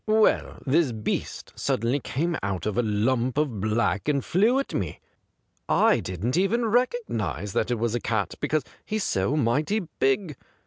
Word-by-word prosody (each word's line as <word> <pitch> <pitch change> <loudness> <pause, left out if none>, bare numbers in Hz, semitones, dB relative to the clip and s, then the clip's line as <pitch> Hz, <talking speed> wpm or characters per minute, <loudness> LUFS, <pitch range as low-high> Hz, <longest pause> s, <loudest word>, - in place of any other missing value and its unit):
Well, 215 0 +3
this 145 0 +3
beast 110 -1 -4
suddenly 120 +6 0
came 165 +6 -1
out 95 -4 -3
of 105 - -1
a 120 - +3
lump 120 +4 0
of 135 -10 0
black 110 -1 0
and 140 -3 0
flew 220 +9 +3
at 275 - -2
me. 95 -6 -3 0.7
I - - +4
didn't 95 - -2
even 230 +5 +2
recognise 210 - -1
that 110 - 0
it 120 - 0
was 115 0 -1
a 120 - 0
cat, 110 -3 -1
because 150 0 0 0.2
he's 215 -1 -2
so 100 +10 0
mighty 150 - +1 0.2
big. 145 +4 +1
130 Hz, 165 wpm, -26 LUFS, 110-170 Hz, 0.7 s, I